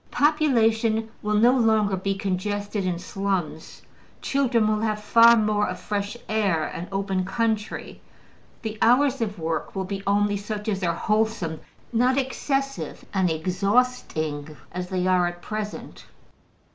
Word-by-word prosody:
Population 225 -7 +2
will 210 0 0
no 240 +4 +5
longer 220 -5 +3
be 195 +1 -2
congested 200 +1 -2
in 175 -2 -1
slums; 185 -3 -3 0.4
children 250 -5 +1
will 215 0 +1
have 215 -1 -1
far 230 +2 +6
more 210 -1 +1
of - - -5
fresh 205 +2 -3
air 200 -7 +1
and 170 +3 -5
open 195 -1 -1
country; 215 +2 -2 0.6
the 220 -1 -5
hours 260 +2 +4
of 205 -3 -2
work 160 +1 -3
will 190 -1 -2
be 195 +1 -4
only 205 0 +2
such 210 +1 -5
as 200 -3 -1
are 170 -2 0
wholesome, 210 -5 0 0.3
not 250 +3 +3
excessive 275 +1 -2
and 190 -2 +2
exhausting 165 -4 -1
as 180 +1 -5
they 185 -1 -1
are 180 -1 +3
at 175 0 -6
present. 210 +2 -6
210 Hz, 140 wpm, -24 LUFS, 185-225 Hz, 0.6 s, far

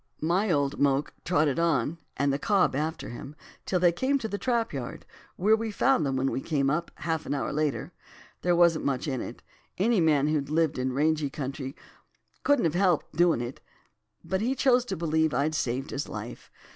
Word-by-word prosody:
My 185 +6 +2
old 145 -4 +1
moke 140 0 +1
trotted 155 -4 +2
on, 165 -1 +1 0.2
and 140 +1 +2
the 140 - -1
cob 200 -9 +2
after 155 +3 -3
him, 135 +5 -8 0.3
till 180 - +1
they 175 -1 +5
came 260 +11 +1
to 235 -5 -4
the 205 -1 -4
trap 235 -5 0
yard, 130 -4 -6 0.3
where 210 +4 +4
we 225 0 -3
found 215 - +2
them 135 - -1
when 135 +1 0
we 135 - -2
came 140 -3 0
up, 170 +3 -1
half 160 -2 -3
an - - -1
hour 140 - -2
after. 150 +2 -2 0.5
There 175 0 +2
wasn't 170 -2 +4
much 135 +2 -1
in 130 -4 -2
it. - - -8 0.3
Any 210 0 +3
man 150 -3 +3
who'd 150 -2 0
lived 160 -3 +1
in 130 0 0
rangey 150 +2 +1
country 135 -1 -5 0.7
couldn't 285 -9 +3
have 160 - +1
helped 180 -4 +1
doin' 170 -6 +3
it; 120 +2 -6 0.6
but 190 0 -1
he 250 +4 0
chose 250 -2 +3
to - - -4
believe 160 -3 +1
I'd 145 +4 +1
saved 135 -2 -2
his 145 - -4
life. 105 +3 -7
155 Hz, 195 wpm, -27 LUFS, 140-180 Hz, 0.7 s, they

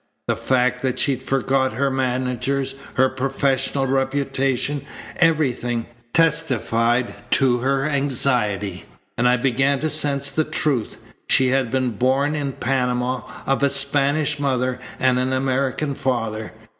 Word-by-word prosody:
The - - +1
fact 125 -1 +1
that 130 -1 -1
she 140 0 +2
forgot 130 0 0
her 140 0 0
managers, 130 +1 -1 0.2
her 130 +1 +4
professional 135 +1 0
reputation, 135 +1 0 0.3
everything, 125 -8 +1 0.3
testified 130 -7 +1 0.2
to 130 -2 +3
her 135 +3 0
anxiety, 125 -8 0 0.3
and 125 - +2
I 125 0 +4
began 135 +2 +1
to 155 0 0
sense 140 -2 +1
the 155 - +1
truth. 150 -6 -1 0.3
She 130 -1 +3
had 130 -2 +1
been 130 -1 0
born 130 +6 +1
in 140 -3 -2
Panama 125 -1 -1 0.2
of 135 0 0
a 140 - +4
Spanish 140 +2 +1
mother 130 -2 0 0.2
and 130 -1 +3
an 130 +1 0
American 135 +2 0
father. 115 -5 -2
135 Hz, 130 wpm, -21 LUFS, 125-140 Hz, 0.3 s, her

